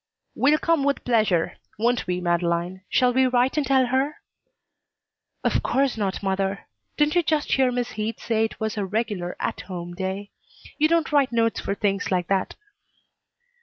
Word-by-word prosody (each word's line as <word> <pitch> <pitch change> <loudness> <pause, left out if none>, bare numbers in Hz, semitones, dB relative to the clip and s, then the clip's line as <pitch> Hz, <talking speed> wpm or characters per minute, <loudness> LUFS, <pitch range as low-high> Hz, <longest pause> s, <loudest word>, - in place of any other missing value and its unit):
"We'll 290 +3 +3
come 330 -2 +1
with 280 0 0
pleasure. 215 -8 +1 0.2
Won't 235 0 +1
we, 180 0 -1
Madeleine? 175 +1 0
Shall 250 -1 +3
we 260 +1 +4
write 250 +1 +2
and 295 -3 0
tell 265 -1 +4
her?" 265 +4 0 1.3
"Of - - +1
course 275 -1 +1
not, 200 -2 -2
mother. 195 0 -1 0.3
Didn't 300 0 +3
you 350 - +4
just 310 -2 0
hear 260 -2 +3
Miss 245 0 -2
Heath 220 0 -4
say 225 -1 +1
it 220 - -7
was 220 0 -1
her 205 -3 -2
regular 205 -4 -2
'at - - -2
home' 175 -2 -7
day? 190 +2 -4 0.5
You 305 - +5
don't 330 -1 +1
write 280 -3 +3
notes 230 -1 +1
for 200 - -2
things 200 -1 -1
like 180 -2 +1
that." 195 -1 0
225 Hz, 170 wpm, -24 LUFS, 190-265 Hz, 1.3 s, You